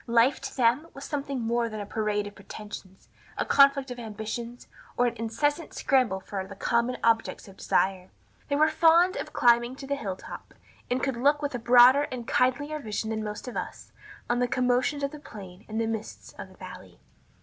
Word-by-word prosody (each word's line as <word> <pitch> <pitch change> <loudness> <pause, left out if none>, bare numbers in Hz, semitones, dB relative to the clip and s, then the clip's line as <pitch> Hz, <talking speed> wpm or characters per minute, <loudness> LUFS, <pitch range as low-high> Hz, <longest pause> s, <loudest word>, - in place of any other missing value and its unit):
Life 235 +3 +3
to - - -7
them 250 +6 +2
was 275 - -8
something 275 -3 -3
more 235 +1 0
than 215 -1 -6
a 205 - -4
parade 210 0 -1
of 205 - -8
pretensions, 200 -1 -10 0.3
a - - 0
conflict 275 -1 +4
of 245 - -6
ambitions, 225 +2 -6 0.3
or 245 - +3
an 240 -1 -1
incessant 290 +8 -1
scramble 255 -9 +2
for 190 0 -5
the 200 - -10
common 235 +4 0
objects 225 -2 +1
of 195 - -14
desire. 185 -1 0 0.4
They 285 - 0
were 305 +2 +4
fond 335 +3 +4
of - - -5
climbing 240 +1 +3
to 275 - -9
the 280 - -2
hill 205 -9 -3
top, - - -11 0.3
and 250 +1 -1
could 270 -3 -1
look 290 +4 +2
with 285 - -2
a 245 - -3
broader 250 +4 +6
and 240 -2 -6
kindlier 285 +4 +1
vision 220 -3 -4
than 220 -1 -2
most 210 +3 -6
of 250 - -6
us - - -6 0.4
on 240 0 +1
the 245 - +2
commotions 250 +4 +1
of 280 - -1
the 300 - -9
plain 195 -7 -11
and 220 +1 -3
the 230 - +1
mists 225 -1 -6
of - - -9
the - - -18
valley. - - -11
240 Hz, 205 wpm, -27 LUFS, 220-275 Hz, 0.4 s, broader